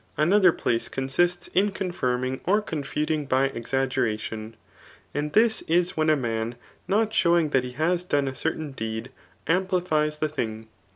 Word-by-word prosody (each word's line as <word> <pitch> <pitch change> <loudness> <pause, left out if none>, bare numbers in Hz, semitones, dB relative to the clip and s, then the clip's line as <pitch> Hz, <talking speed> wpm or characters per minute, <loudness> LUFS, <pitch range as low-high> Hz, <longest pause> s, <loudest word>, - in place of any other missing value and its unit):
Another 180 +4 +5
place 115 -7 -1
consists 175 +7 0
in 200 +3 +2
confirming 130 -9 -2
or 205 +4 +4
confuting 150 -4 -2
by 135 +1 +2
Exaggeration. 115 -3 -2 0.6
And 150 +1 -2
this 220 +2 +4
is 175 +2 +2
when 155 0 +2
a 155 - +5
man 115 -3 -2 0.3
not 215 +3 +1
showing 170 -6 +3
ths^ 135 - +3
he 125 0 -6
has 170 +6 +1
done 145 -6 0
a 135 - -2
certain 150 +3 -3
deed, 110 -1 -5 0.3
amplifies 165 -4 +1
tbe 155 -1 -1
thing. 110 -6 -4
150 Hz, 150 wpm, -25 LUFS, 130-175 Hz, 0.6 s, Another